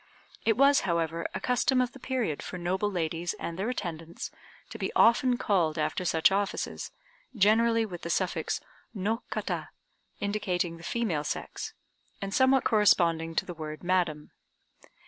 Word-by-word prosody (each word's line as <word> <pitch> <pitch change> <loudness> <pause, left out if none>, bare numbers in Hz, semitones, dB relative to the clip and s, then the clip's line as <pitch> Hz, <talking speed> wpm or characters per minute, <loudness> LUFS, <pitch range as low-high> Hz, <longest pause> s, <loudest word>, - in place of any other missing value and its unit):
It 225 0 +3
was, 280 +1 +6
however, 170 -2 -1
a - - -1
custom 255 +1 +2
of 250 -1 +1
the 270 - -13
period 245 - -2
for 180 - -6
noble 185 +4 0
ladies 170 -2 -2
and 170 - -5
their 210 +5 0
attendants 170 -8 -5 0.4
to - - -7
be - - -2
often 245 +2 +5
called 170 -9 +1
after 180 +4 -1
such 165 +1 +4
offices, 200 0 -2 0.5
generally 225 +2 +4
with 180 -5 -7
the 170 - -5
suffix 185 +2 0 0.4
"No 215 +4 -1
Kata," - - -3 0.5
indicating 185 -5 -1
the 165 - -13
female 185 -9 -1
sex, - - -5 0.4
and 195 -1 -4
somewhat 260 +1 +4
corresponding 170 -6 +3
to - - +1
the 175 - -6
word 155 -1 -7
"madam." 175 -4 0
185 Hz, 150 wpm, -29 LUFS, 165-225 Hz, 0.5 s, was